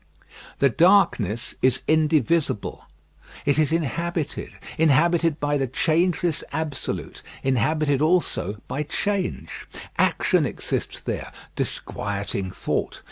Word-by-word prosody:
The 140 - +4
darkness 130 - +3
is 130 0 +3
indivisible. 155 -5 +1 0.6
It 145 +1 +3
is 155 0 +3
inhabited. 165 0 -2 0.3
Inhabited 165 +1 +3
by 145 0 0
the 135 - 0
changeless 165 +4 +1
absolute; 160 -4 -3 0.2
inhabited 140 +3 +1
also 155 - +1
by 145 - -2
change. 190 +5 -3 0.3
Action - - +3
exists - - -3
there, - - -4 0.2
disquieting 100 -1 -3
thought! - - -3
155 Hz, 95 wpm, -24 LUFS, 130-165 Hz, 0.6 s, The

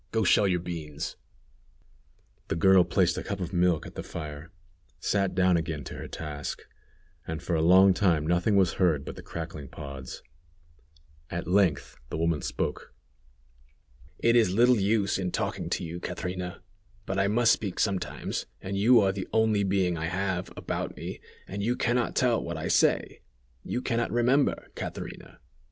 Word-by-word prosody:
Go 110 -1 +1
shell 100 +1 +4
your 90 -2 +1
beans." 80 -4 -5 1.3
The - - -1
girl 95 +2 +6
placed 90 0 +1
a - - -6
cup 100 -3 -4
of 90 -1 -4
milk 90 -3 +2
at - - -9
the - - -5
fire, 75 0 -7 0.5
sat 100 -2 0
down 90 -1 +4
again 80 -3 -3
to - - -8
her - - -6
task, 75 -2 -6 0.6
and, 80 -1 -3
for 85 - -3
a 80 - +2
long 95 +3 +7
time, 85 -5 +2
nothing 90 +5 +2
was 95 -4 +4
heard 80 -7 +3
but - - -6
the - - -9
crackling 80 -4 -7
pods. 70 -2 -8 1.1
At 85 - -4
length 90 -5 +1
the - - -3
woman 80 -2 +1
spoke. - - -4 1.2
"It 115 +1 +3
is 115 -6 +4
little 120 +3 +4
use 100 -1 +1
in 90 -1 -1
talking - - -3
to - - -1
you, 85 +1 -5
Catrina: 90 0 -5 0.4
but 95 0 -2
I 95 - +3
must 115 +3 +4
speak 100 -4 -3
sometimes, 100 -3 -2
and 95 +1 -5
you 115 +4 +6
are 95 -1 +3
the 95 -1 -5
only 110 -2 +3
being 95 -3 +1
I 80 - -2
have, 95 0 -2
about - - -4
me, - - -6 0.3
and 100 +2 -5
you 120 +4 +1
can 120 -1 +1
not 125 -2 0
tell 120 -3 +2
what 85 -1 -4
I 80 +4 -3
say. 90 - +2 0.4
You 125 - -3
can 115 - 0
not 120 - 0
remember, 125 +4 +2
Catrina! - - -7
90 Hz, 175 wpm, -28 LUFS, 85-100 Hz, 1.3 s, long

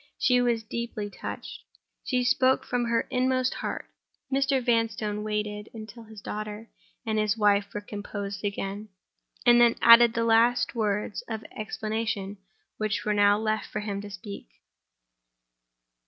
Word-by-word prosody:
She 250 -1 +3
was 235 -2 +1
deeply 215 -2 -5
touched—she 250 +4 -6
spoke 260 +1 +3
from 245 -1 -1
her 230 0 +1
inmost 255 0 +1
heart. - - -4 0.5
Mr. 275 0 +2
Vanstone 225 -3 0
waited 210 0 -3
until 220 +1 -9
his 220 -2 -12
daughter 215 +2 -6 0.3
and 220 -1 0
his 215 +1 +1
wife 205 -1 +3
were 210 - -4
composed 205 -1 -6
again; 200 +1 -4 0.6
and 240 -1 +7
then 235 -1 +5
added 235 0 +8
the 230 - +1
last 230 +2 +3
words 210 -2 -1
of 220 -1 -4
explanation 215 -2 -3 0.4
which 215 -1 -2
were 210 - +1
now 205 0 +4
left 215 0 -1
for 210 - -4
him 200 -1 -4
to 205 - -8
speak. 200 - -9
215 Hz, 140 wpm, -27 LUFS, 210-235 Hz, 0.6 s, added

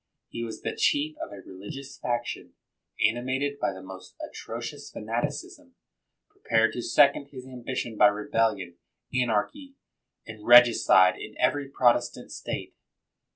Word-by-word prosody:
He 115 - -5
was 115 -1 -7
the - - -3
chief 150 +2 +1
of - - -6
a 100 - -9
religious 130 +9 -9
faction, 120 -1 -3 0.5
animated 130 +5 -2
by - - 0
the 95 -1 -10
most 95 0 -11
atrocious - - -7
fanaticism, - - -5 0.5
prepared 115 -1 +1
to 120 - -4
second 140 +2 +3
his 130 -3 -10
ambition 125 -3 -5
by 105 - +7
rebellion, 105 -3 0 0.4
anarchy, 125 - -1 0.5
and 110 -1 -10
regicide 120 -6 +7
in 105 - -9
every 140 +2 +1
Protestant 120 -2 +1
state. - - -5
120 Hz, 125 wpm, -27 LUFS, 105-130 Hz, 0.5 s, by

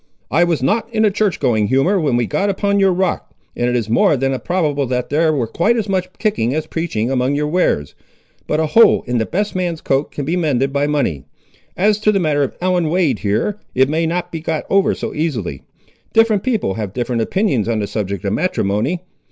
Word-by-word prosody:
I 165 +5 +4
was 165 -6 -1
not 225 - 0
in 220 -1 +2
a 210 - +3
church 205 -1 0
going 110 -4 +1
humour 135 - +2
when 145 -7 +1
we 120 - +1
got 150 - -1
upon 200 +1 0
your 195 -1 +4
rock, 185 +1 -2 0.2
and 120 0 0
it 125 - 0
is 115 -3 -1
more 115 +5 +3
than 135 +1 0
probable 150 -2 -1
there 145 +6 +1
was 130 -7 -1
quite 225 +8 +2
as 220 -2 -1
much 185 -2 -1
kicking 140 - 0
as 155 0 -2
preaching 150 -8 -2
among 130 +1 +1
your 150 +1 0
wares; 150 - 0 0.5
but 150 - 0
a 160 - +2
hole 225 +10 +5
in 125 -1 -1
the 110 - -1
best 205 +4 -2
man's 175 -3 -2
coat 135 0 -1
can 145 - -5
be 165 +5 -1
mended 135 -6 0
by 145 +1 +1
money. 115 - -1 0.5
As 205 +3 +2
to 215 0 +3
the 200 - +1
matter 150 -4 +1
of 135 - -2
Ellen 180 -3 +1
Wade, 170 -4 +1
here, 110 - -1 0.2
it 130 +1 +3
may 160 +2 0
not 175 +1 -2
be 165 - -4
got 160 -1 -3
over 195 0 +3
so - - -5
easily. 120 - -3 0.5
Different 225 -3 +4
people 225 - -1
have 105 -2 -5
different 120 -1 -1
opinions 135 - 0
on 115 - 0
the 105 - -1
subject 100 -2 -4
of 100 - 0
matrimony. 150 - 0
155 Hz, 215 wpm, -18 LUFS, 125-185 Hz, 0.5 s, hole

